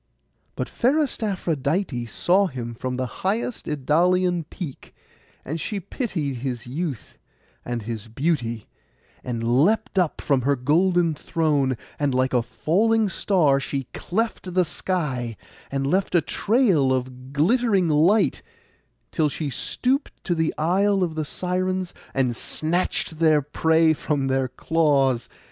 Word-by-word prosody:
But - - -3
fairest 275 +1 +1
Aphrodite 160 - -1
saw 185 - +2
him 120 -6 -6
from 125 +2 -4
the 130 - -1 0.2
highest 220 +5 -1
Idalian 170 +4 +2
peak, 160 -9 -8 0.5
and 160 +4 -4
she 210 - -3
pitied 170 - -3
his 125 -1 -4
youth 135 - -5 0.4
and 120 -2 -4
his 110 0 -5
beauty, 115 -3 -1 0.6
and 115 -2 -3
leapt 155 - +2
up 175 -4 0
from 140 -3 +1
her 140 +3 +2
golden 165 +6 +2
throne; 145 -5 0 0.2
and 145 -3 +1
like 130 +1 +1
a 125 - +4
falling 215 - +1
star 160 -9 +2
she 140 0 -3
cleft 190 -2 -3
the 180 -1 +4
sky, 140 - -2 0.3
and 135 0 -2
left 185 +5 +1
a 170 - +5
trail 195 - +2
of 130 0 -3
glittering 195 - +2
light, 165 +8 +3 0.7
till 155 -3 +1
she 145 0 -4
stooped 260 - -1
to 175 - 0
the 160 -1 +1
Isle 190 +4 +2
of 170 -3 -1
the 155 -1 -2
Sirens, 185 +2 -2 0.2
and 130 -3 +1
snatched 160 +3 -1
their 155 -3 +4
prey 160 +2 +3
from 145 -2 -1
their 130 0 +1
claws. 135 -3 +1
155 Hz, 135 wpm, -24 LUFS, 130-185 Hz, 0.7 s, a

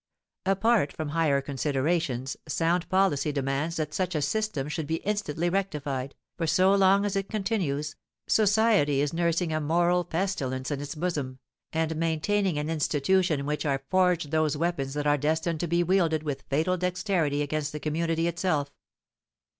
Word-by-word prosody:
Apart 195 -4 +3
from 155 -2 -5
higher 150 -3 +2
considerations, 140 -1 -1
sound 170 +1 0
policy 185 -6 +2
demands 140 +3 -1
that 150 -2 -3
such 185 -2 -1
a 150 - +1
system 200 -4 -1
should 150 0 -3
be 160 - 0
instantly 185 -6 -1
rectified, 145 -8 -2 0.2
for 165 - 0
so 185 +4 +4
long 195 +1 +4
as 205 - -1
it 195 0 -2
continues, 175 -9 -2 0.3
society 210 -9 +3
is 145 +1 0
nursing 170 0 0
a 155 - 0
moral 175 +3 +2
pestilence 150 -8 -2
in 140 -1 -2
its 145 -1 -6
bosom, 150 -6 -3 0.3
and 160 0 -1
maintaining 165 +3 0
an 150 0 -2
institution 160 +2 +1
in - - -5
which 150 +1 -2
are 135 -2 -1
forged 180 -5 +2
those 155 -2 +1
weapons 145 -4 -1
that 145 0 -2
are 145 0 +3
destined 160 +2 0
to 175 - -1
be 170 +1 +2
wielded 170 -4 +2
with 140 -3 -4
fatal 160 +6 +1
dexterity 180 -5 0
against 150 0 -2
the 150 - -5
community 165 +2 0
itself. 165 -5 -1
160 Hz, 160 wpm, -27 LUFS, 145-180 Hz, 0.3 s, so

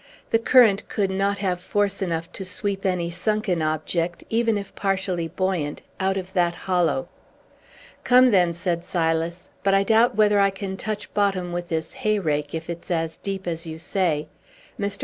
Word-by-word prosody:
The 225 - +4
current 230 -4 +5
could 195 -2 0
not 200 +1 0
have 185 -3 -1
force 200 +1 0
enough 170 -2 -2
to 195 - -6
sweep 195 +1 -2
any 175 -2 -1
sunken 190 -1 0
object, 160 +2 -1
even 225 -1 +2
if 200 -1 -7
partially 190 -3 -1
buoyant, 175 -4 -2 0.2
out 190 0 +1
of 190 0 -6
that 175 -1 +2
hollow." 180 +8 0 1.0
"Come, 250 0 +6
then," 180 -4 +4
said 170 0 -2
Silas; 165 0 -1
"but 195 0 +3
I 195 - +4
doubt 230 +4 +4
whether 210 -1 +4
I 200 0 +5
can 195 0 -5
touch 210 +1 -5
bottom 195 -3 +1
with 175 0 -4
this 160 +4 -2
hay 215 -5 0
rake, 150 -5 -1
if 160 0 -5
it's 170 0 -7
as 165 -2 -1
deep 195 -1 -5
as 165 -1 -4
you 160 0 -6
say. 160 -3 -1 0.5
Mr. 200 0 -2
190 Hz, 175 wpm, -24 LUFS, 170-200 Hz, 1.0 s, Come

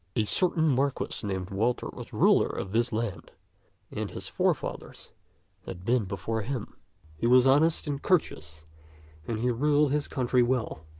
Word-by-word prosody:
A 110 - +2
certain 160 - +2
marquis 140 -1 -1
named 95 -1 -4
Walter 115 +5 0
was - - -9
ruler - - +4
of 95 - -5
this 115 +3 +1
land, 110 -3 -4 0.6
as - - -4
his - - -7
forefathers - - -3 0.6
had 90 0 -8
been 120 -2 +2
before 100 +4 -3
him. 120 0 -5 0.4
He 115 - 0
was 125 +1 +6
honest 150 +5 +3
and 145 -2 -3
courteous, 80 - -1 0.6
and 115 - -2
he 125 +1 +1
ruled 145 +3 +2
his 150 0 0
country 125 -1 +1
well. 120 -10 -1
120 Hz, 155 wpm, -27 LUFS, 100-140 Hz, 0.6 s, was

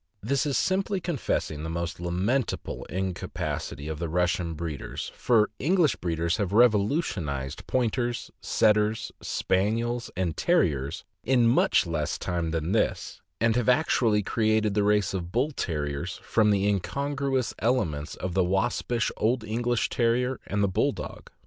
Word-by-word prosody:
This 140 +6 +1
is 140 - +1
simply 195 +1 +1
confessing 140 - -2
the 80 - -4
most 85 0 -3
lamentable 95 +9 -1
incapacity 90 -5 -4
of 80 -1 -4
the 85 - -2
Russian 90 -1 0
breeders, 75 -2 -5
for 110 -4 +2
English 170 0 +3
breeders 85 0 -1
have 100 -4 -1
revolu 110 - +4
tionized 70 - -4
Pointers, 120 -1 -1
Setters, 105 0 +2
Spaniels, 115 +5 0
and 90 -4 -1
Terriers 75 - +1 0.2
in 125 -1 +3
much 115 -4 +4
less 80 -3 -2
time 85 -2 -2
than 80 +1 -2
this, 110 - -1 0.2
and 115 0 +3
have 125 -1 +2
actually 120 -6 +3
created 110 -1 +1
the 105 - +2
race 105 -1 +2
of 90 -2 -4
Bull 130 +8 +1
Terriers 75 - -3
from 110 -2 +3
the 100 -1 +2
incongruous 135 +6 -1
elements 80 - 0
of 90 -1 -4
the 95 0 +3
waspish 95 +5 0
old 115 +2 +1
English 120 +2 0
Terrier 125 +2 +1
and 100 +1 0
the - - +4
Bulldog. 110 +9 -2
105 Hz, 145 wpm, -27 LUFS, 85-120 Hz, 0.2 s, revolu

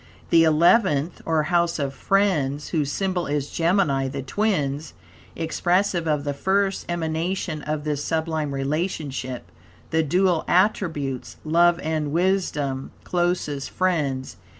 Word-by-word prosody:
The 165 -1 +6
Eleventh, 160 0 +3
or 160 -2 +2
House 170 +1 +1
of 140 -3 -2
Friends, 150 -5 +1
whose 150 -4 0
symbol 185 -1 -1
is 145 -1 -2
Gemini, 165 -6 +2
the 135 0 -5
Twins, 150 -4 -1 0.4
expressive 175 +1 0
of 150 -2 +1
the 145 -1 -2
first 195 +6 0
emanation 165 0 -2
of 150 0 -3
this 150 -1 -2
sublime 160 -2 -1
relationship, 140 -3 -3 0.5
the 160 - +3
dual 175 +2 +2
attributes, 160 - 0
love 170 +2 +4
and 155 -2 -1
wisdom, 155 -6 0
closest 175 -6 -1
friends. 150 -8 -1
160 Hz, 120 wpm, -24 LUFS, 145-175 Hz, 0.5 s, The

